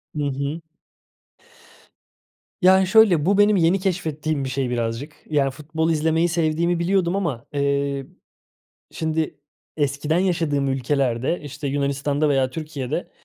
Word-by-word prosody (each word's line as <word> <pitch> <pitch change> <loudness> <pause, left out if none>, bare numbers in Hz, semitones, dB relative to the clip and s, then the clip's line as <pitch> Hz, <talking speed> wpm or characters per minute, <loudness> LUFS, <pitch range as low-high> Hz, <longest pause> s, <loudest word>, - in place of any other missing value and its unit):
Hı 150 - -1
hı. 140 +4 -3 2.0
Yani 190 0 +5
şöyle, 190 -7 +5
bu 200 +2 +3
benim 205 0 +5
yeni 175 +3 +3
keşfettiğim 155 -6 -2
bir 130 - -3
şey 130 -1 -1
birazcık, 120 +5 -3
yani, 140 -3 +1
futbol 160 +4 -2
izlemeyi 160 +2 +1
sevdiğimi 170 +1 0
biliyordum 180 0 +1
ama, 150 -11 -2
eee, 140 -1 0 0.9
şimdi 160 -1 -2 0.4
eskiden 145 +2 0
yaşadığım 165 -7 0
ülkelerde, 135 +2 0
işte, 145 0 -6
Yunanistan'da 140 +1 0
veya 135 -2 +2
Türkiye'de, 150 +1 -4
150 Hz, 120 wpm, -22 LUFS, 140-170 Hz, 2.0 s, Yani